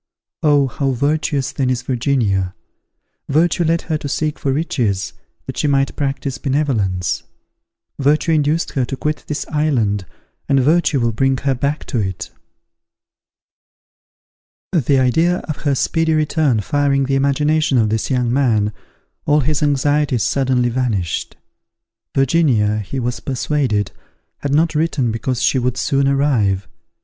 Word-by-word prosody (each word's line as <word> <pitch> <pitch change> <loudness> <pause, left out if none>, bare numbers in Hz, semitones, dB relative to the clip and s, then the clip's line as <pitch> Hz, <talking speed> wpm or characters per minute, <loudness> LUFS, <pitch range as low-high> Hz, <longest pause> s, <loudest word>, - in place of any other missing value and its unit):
_ - - -68 0.4
Oh! 145 -2 +4
how 135 +1 -1
virtuous, 140 +1 0
then, 130 -2 -1
is 125 -1 -1
Virginia! 115 -8 0 0.7
Virtue 165 +4 +2
led 165 +1 +1
her 155 -2 -2
to 145 - -5
seek 155 +1 -2
for 135 - -1
riches, 120 - -1 0.3
that - - -7
she - - +1
might 135 -1 +1
practise 135 -2 -3
benevolence. 120 - 0 0.8
Virtue 150 +4 +2
induced 155 +1 +1
her 135 - 0
to 130 +2 -4
quit 150 +4 -2
this 150 - -3
island, 115 - 0 0.4
and 135 - +4
virtue 150 +1 +2
will 115 -1 +1
bring 135 +4 +1
her 135 +1 0
back 140 +4 -2
to 120 - -2
it. 95 -3 -4 2.4
The 145 -6 +2
idea 160 +8 +2
of 155 - -3
her 145 -2 0
speedy 160 +4 +1
return 150 -6 +1
firing 140 +4 +1
the 135 - -1
imagination 140 +1 +2
of 110 -3 +3
this 110 0 -1
young 125 -2 +1
man, 110 -6 +2 0.5
all 150 +1 +4
his 150 +3 -1
anxieties 145 -3 +1
suddenly 130 -3 +1
vanished. 115 -9 -2 0.8
Virginia, 130 -7 +2
he 110 +6 -4
was 125 0 -2
persuaded, 130 -6 -1 0.5
had 140 - -3
not 160 +3 +2
written, 150 -6 0
because 120 +2 -2
she 130 - +3
would 125 0 -1
soon 135 +1 +1
arrive. 125 -9 +1
135 Hz, 140 wpm, -18 LUFS, 120-150 Hz, 2.4 s, Oh